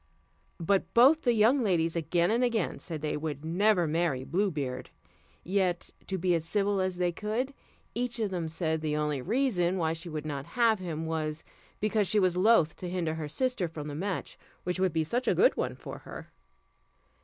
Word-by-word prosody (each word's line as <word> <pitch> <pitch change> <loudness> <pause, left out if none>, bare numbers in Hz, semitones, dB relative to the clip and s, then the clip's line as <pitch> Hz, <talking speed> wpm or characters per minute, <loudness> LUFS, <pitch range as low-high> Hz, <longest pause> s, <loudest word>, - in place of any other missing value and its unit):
But 190 +3 +1
both 275 +7 +7
the 245 -5 +3
young 230 +5 +4
ladies 170 -6 +1
again 170 +3 +1
and 235 +3 +2
again 230 -6 0
said 160 -4 -6
they 150 - -1
would 150 -1 -4
never 180 +2 +3
marry 155 -4 0
Blue 180 +10 +1
Beard; 135 -6 -4 0.5
yet, 185 -2 0 0.2
to 190 - -2
be 180 0 +1
as 165 -2 +1
civil 200 +3 0
as 185 -1 -1
they 180 -1 +1
could, 220 +9 -2 0.4
each 240 0 -2
of 215 -4 -1
them 170 -3 -2
said, 160 -1 -1
the 155 -1 -1
only 150 -3 -1
reason 190 - +1
why 160 -2 +1
she 165 +1 -7
would 155 -1 -5
not 140 -1 -4
have 230 -3 +4
him 165 -3 -4
was, 160 -1 -2 0.4
because 215 -1 +1
she 215 - +3
was 185 -2 +2
loath 180 -4 +4
to 180 - -5
hinder 175 -3 -1
her 160 -2 -5
sister 250 - -1
from 155 -2 -7
the 145 - -5
match, 185 +5 -4 0.2
which 180 +1 -2
would 190 -1 +2
be 160 0 +1
such 240 +11 -2
a - - +3
good 170 - +5
one 125 0 -2
for - - -8
her. - - -10
175 Hz, 200 wpm, -29 LUFS, 160-210 Hz, 0.5 s, both